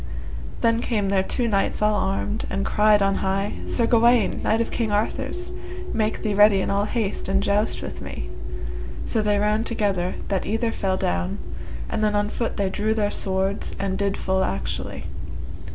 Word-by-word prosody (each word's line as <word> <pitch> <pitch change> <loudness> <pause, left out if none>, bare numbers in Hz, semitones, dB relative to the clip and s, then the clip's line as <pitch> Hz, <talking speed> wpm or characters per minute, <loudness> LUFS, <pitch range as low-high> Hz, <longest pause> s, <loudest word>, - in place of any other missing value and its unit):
Then 230 0 +3
came 210 -6 0
there 195 -1 +3
two 235 +5 0
knights 200 -3 +1
all 210 0 +3
armed, 205 +2 -1
and 195 - -1
cried 210 -1 +4
on 195 0 +3
high, 195 +1 0
Sir 235 - +2
Gawaine! 235 -1 +4
knight 220 - +2
of 230 - 0
King 225 -3 -1
Arthur's, 220 +11 -1 0.4
make 215 -1 0
thee 210 -2 +1
ready 205 -1 +6
in 190 - 0
all 200 +1 +2
haste 215 -2 -2
and 195 +1 +2
joust 205 +2 +1
with - - -6
me. - - -6 0.8
So 220 - +1
they 210 -1 +2
ran 210 +2 +2
together, 200 -6 0
that 195 -2 +1
either 225 +2 +1
fell 190 -4 0
down, 90 - -1 0.5
and 215 - -1
then 210 -1 +2
on 205 0 +1
foot 230 +1 -2
they 200 -2 +1
drew 215 +3 0
their 205 -2 +1
swords, 190 +1 -1
and 195 -1 -1
did 200 0 0
full 190 0 +1
actually. 95 -1 -3
205 Hz, 180 wpm, -24 LUFS, 195-220 Hz, 0.8 s, ready